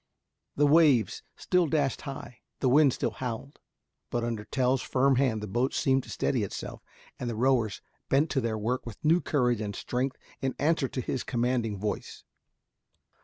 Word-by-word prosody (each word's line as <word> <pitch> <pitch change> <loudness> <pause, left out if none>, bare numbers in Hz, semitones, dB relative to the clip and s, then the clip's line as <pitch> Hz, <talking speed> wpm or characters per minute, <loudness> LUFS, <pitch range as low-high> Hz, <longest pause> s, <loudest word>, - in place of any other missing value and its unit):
The 145 - +3
waves 145 - +4
still 180 -2 +1
dashed 145 -3 0
high, 135 -3 -8 0.2
the 130 - +2
wind 140 +1 +6
still - - -1
howled, 130 +3 -6 0.5
but 120 -1 -1
under 115 -3 -3
Tell's 130 0 +1
firm 135 0 +2
hand 120 -6 +1
the - - -4
boat 120 +7 0
seemed 135 0 +2
to - - -13
steady 125 - 0
itself, 100 - -5 0.4
and 125 - -3
the 115 - -3
rowers 120 -3 +1 0.3
bent 145 +4 +3
to 135 - +1
their 115 -2 -1
work 120 +4 -1
with 115 -4 -8
new 165 +3 +4
courage 125 -6 +1
and 100 -2 -4
strength 130 +2 -2 0.2
in 130 -1 -1
answer 150 -1 +2
to 130 - -4
his 125 - -3
commanding 120 -3 0
voice. 105 +1 -4
130 Hz, 170 wpm, -28 LUFS, 115-140 Hz, 0.5 s, wind